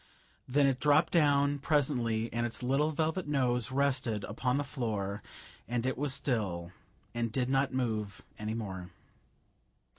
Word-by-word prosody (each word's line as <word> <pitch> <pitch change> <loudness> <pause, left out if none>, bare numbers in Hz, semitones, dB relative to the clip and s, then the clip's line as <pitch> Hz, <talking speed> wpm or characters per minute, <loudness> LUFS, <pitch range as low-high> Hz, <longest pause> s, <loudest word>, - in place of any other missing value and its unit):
Then 140 +2 +3
it 135 -2 +2
dropped 150 +4 +4
down, 145 -3 +3
presently, 125 -6 +1
and 120 0 0
its 120 +1 -3
little 135 +4 +2
velvet 160 +2 -1
nose 125 -4 +1
rested 130 -6 +1
upon 125 +5 -1
the 145 - 0
floor, 105 -8 -3 0.5
and 120 0 -1
it 130 - 0
was 145 +1 -1
still, 105 -11 -1 0.4
and 120 -1 -1
did 125 +1 0
not 135 0 +2
move 110 -6 -2 0.2
any 110 +1 -3
more. 95 -5 -5
125 Hz, 145 wpm, -31 LUFS, 110-140 Hz, 0.5 s, dropped